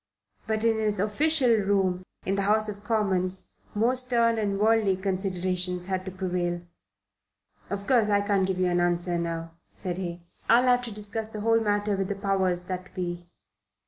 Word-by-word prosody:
But 220 0 -1
in 225 -1 +2
his 210 -2 0
official 260 +6 +3
room 195 -3 +1 0.2
in 195 - 0
the 200 - 0
House 215 +2 +4
of 205 -1 -7
Commons 190 -4 0 0.3
more 230 +5 +2
stern 235 -3 +2
and 200 -2 -1
worldly 215 -2 +3
considerations 185 -2 -1
had 185 0 -3
to 190 - -5
prevail. 180 -2 -2 1.1
"Of 200 0 -4
course 230 -4 +3
I 205 -1 +3
can't 200 -2 +1
give 190 -1 -1
you 185 - +1
an 175 -1 +1
answer 175 0 +1
now," 165 -1 -4 0.2
said 180 -2 -3
he. 175 -2 -5 0.3
"I'll 235 +2 +6
have 250 -1 +4
to 235 - -6
discuss 210 +1 -2
the 215 -1 -6
whole 225 +1 +3
matter 205 -1 0
with 195 -1 -2
the 200 - -3
powers 190 -3 0
that 185 0 -6
be. 175 -1 -4
195 Hz, 175 wpm, -26 LUFS, 180-215 Hz, 1.1 s, I'll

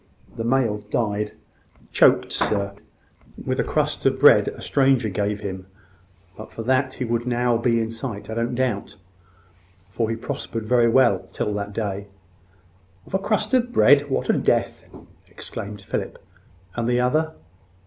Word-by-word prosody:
"The 115 - -4
male 115 -3 +1
died; 105 -2 -1 0.6
choked, - - +4
sir, 100 -1 0 0.7
with - - -1
a - - +3
crust - - -1
of - - +1
bread - - +7
a - - -5
stranger 135 -5 +2
gave 105 +1 -2
him. 95 -2 -6 0.7
But 110 - -10
for 115 - -6
that, 130 +2 +1
he 130 - -3
would 115 0 0
have 125 - -4 0.3
been 115 -1 +2
now - - +2
in 115 0 -2
sight, 115 -2 -6
I 110 - -5
don't 115 +2 -1
doubt; 120 -5 -2 0.9
for 110 +3 -2
he 115 - -1
prospered 115 0 -5
very 120 0 +3
well 120 -6 +4
till 105 - -2
that 100 0 -4
day." 100 -2 -3 1.0
"Of - - -17
a 190 - +2
crust 215 +2 -1
of 245 -1 +2
bread! 145 - +5
What 135 - -1
a - - +3
death!" - - 0 0.4
exclaimed 100 0 -8
Philip. - - -4 0.6
"And 120 -1 -1
the 120 0 +2
other?" 155 +6 +1
115 Hz, 160 wpm, -23 LUFS, 105-130 Hz, 1.0 s, bread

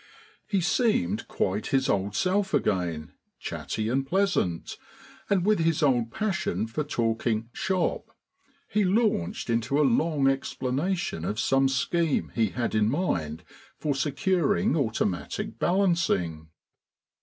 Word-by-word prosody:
He 195 -3 +1
seemed 225 +3 +1
quite 100 +3 -1
his 135 0 +1
old 100 -3 0
self 195 +1 +1
again, 85 -5 -1 0.3
chatty 110 0 -4
and 130 +4 +1
pleasant, 150 - 0 0.5
and 190 -3 +2
with 210 -2 +3
his 165 -1 +1
old 120 -5 +2
passion 190 - -1
for 115 +7 -3
talking 115 -4 -1
"shop." 185 -3 -1 0.6
He 210 0 +1
launched 195 - +1
into 115 +4 0
a 150 - +4
long 145 +2 +2
explanation 135 - -1
of 105 +5 -2
some 135 +1 +3
scheme 160 +4 0
he 115 -2 +2
had 120 +4 -3
in 110 0 +3
mind 90 - -1 0.3
for 150 -2 -1
securing 145 - +1
automatic 110 - -2
balancing. 170 - +1
135 Hz, 120 wpm, -27 LUFS, 110-180 Hz, 0.6 s, a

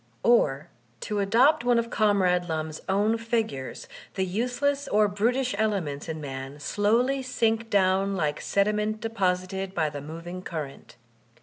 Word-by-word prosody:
Or, 155 - +3 0.3
to 210 -1 -2
adopt 240 +9 +4
one 245 -1 +3
of 235 0 -1
Comrade 185 -5 +2
Lum's 155 -1 -3
own 210 +4 +2
figures, 225 - -3 0.3
the 190 - 0
useless 250 +8 -1
or 210 0 +3
brutish 245 +6 0
elements 175 -10 -1
in 160 -1 -4
man 135 0 -7
slowly 230 - +1
sink 230 -3 0
down 195 0 +2
like 150 -5 -1
sediment 210 +2 0
deposited 190 -3 -2
by 155 -3 +1
the 145 -1 -6
moving 165 +4 -7
current. 155 -9 -7
200 Hz, 135 wpm, -26 LUFS, 165-225 Hz, 0.3 s, adopt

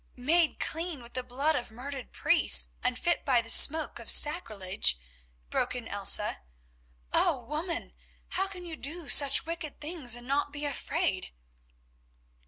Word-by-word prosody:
"Made 315 +6 +1
clean 325 -5 -4
with 235 - -16
the 255 - -3
blood 270 +5 -2
of 250 - -5
murdered 260 +3 -9
priests, - - +3
and 250 - 0
fit 345 +5 -2
by 255 -3 +2
the 230 -1 -3
smoke 315 +6 +5
of - - -8
sacrilege?" 200 - +2 0.5
broke - - -2
in - - -7
Elsa. - - +3 0.7
"Oh! 255 - +1
woman, 335 +5 -5 0.4
how 385 +1 -2
can 365 -2 -10
you 330 -2 -8
do 315 +2 -6
such 280 +3 +6
wicked 330 -3 -7
things 295 -6 -1
and 240 0 -10
not 285 +1 -1
be 290 0 -5
afraid?" 290 - -3
285 Hz, 150 wpm, -28 LUFS, 245-330 Hz, 0.7 s, such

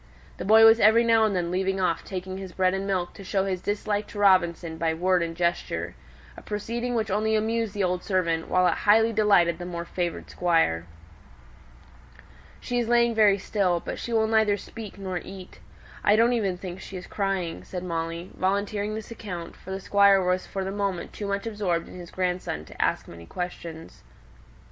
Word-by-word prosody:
The - - -5
boy 220 +2 +7
was 225 +1 +7
every 220 +2 +6
now 225 -1 +4
and 210 -3 0
then 175 -1 -1
leaving 190 +1 0
off 180 -3 0
taking 185 0 -6
his 190 -2 -8
bread 185 0 +2
and 195 +1 -2
milk 185 -3 -1
to 195 - -11
show 195 +1 0
his 185 -2 -2
dislike 205 +1 -2
to - - -11
Robinson 175 -4 +2
by 160 -1 0
word 180 +1 +2
and 165 0 -3
gesture: 175 -1 -1 0.4
a - - -11
proceeding 235 +4 -3
which 220 -3 -1
only 215 +2 +1
amused 225 0 -1
the 200 - 0
old 180 0 -1
servant, 170 -5 0
while 185 0 +3
it - - +4
highly 225 +2 +3
delighted 190 -6 +3
the 175 - -5
more 170 -1 -5
favoured 175 -1 -3
Squire. 165 - +1 1.7
"She 245 0 -2
is 235 - -1
lying 235 0 +3
very 210 -3 +5
still, 185 -3 0
but - - -6
she 235 - -5
will 220 -1 +3
neither 220 -2 +3
speak 215 -1 -9
nor 190 -2 -4
eat. 190 0 -11 0.4
I 205 - +5
don't 230 +3 +4
even 200 -6 0
think 180 0 -7
she 190 0 -8
is 180 - -8
crying," 195 -4 -2
said 180 -1 -6
Molly, 165 0 -4
volunteering 200 +2 -1
this 220 +1 -7
account, 180 -7 -7
for - - -14
the 190 0 -3
Squire 200 0 +5
was 180 0 0
for 195 - -4
the 190 - -3
moment 200 -3 -3
too 205 - -5
much 200 +1 -2
absorbed 200 -7 -1
in - - -12
his 175 -1 -9
grandson 180 - -2
to - - -8
ask - - 0
many 85 0 -12
questions. 170 -2 -7
190 Hz, 195 wpm, -26 LUFS, 180-210 Hz, 1.7 s, boy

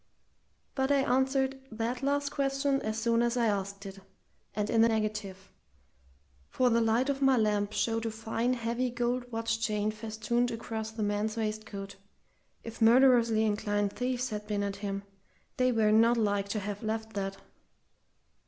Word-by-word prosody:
But 265 0 0
I 280 -1 +3
answered 265 +1 +1
that 230 +3 -3
last 285 +1 0
question 275 0 0
as 215 0 -3
soon 230 +1 +2
as 240 +1 +1
I 235 - +2
asked 200 -1 -2
it, 195 0 -8 0.6
and 210 0 -1
in 225 0 +3
the 230 - +6
negative, 210 -3 -3 1.0
for 250 -1 +2
the 230 0 +3
light 225 +3 +2
of 280 -1 -1
my 270 -1 +4
lamp 210 -2 +1
showed 225 0 -1
a - - 0
fine, 225 +2 -1
heavy 235 +2 -1
gold 245 +1 -2
watch 225 0 -1
chain 215 -2 0
festooned 220 +2 -1
across 225 -1 -4
the 220 -1 -4
man's 210 +2 -1
waistcoat 215 -2 -4 0.7
if 230 0 -9
murderously 230 -2 +5
inclined 205 -1 0
thieves 250 0 -2
had 210 0 -5
been 205 -1 -1
at 200 0 -3
him, 200 -1 -4 0.5
they 255 0 +3
were 220 -3 +3
not 230 +2 +5
like 205 -2 0
to 215 - -1
have 205 0 -5
left 220 0 -3
that. 195 -1 -3
225 Hz, 160 wpm, -30 LUFS, 210-245 Hz, 1.0 s, the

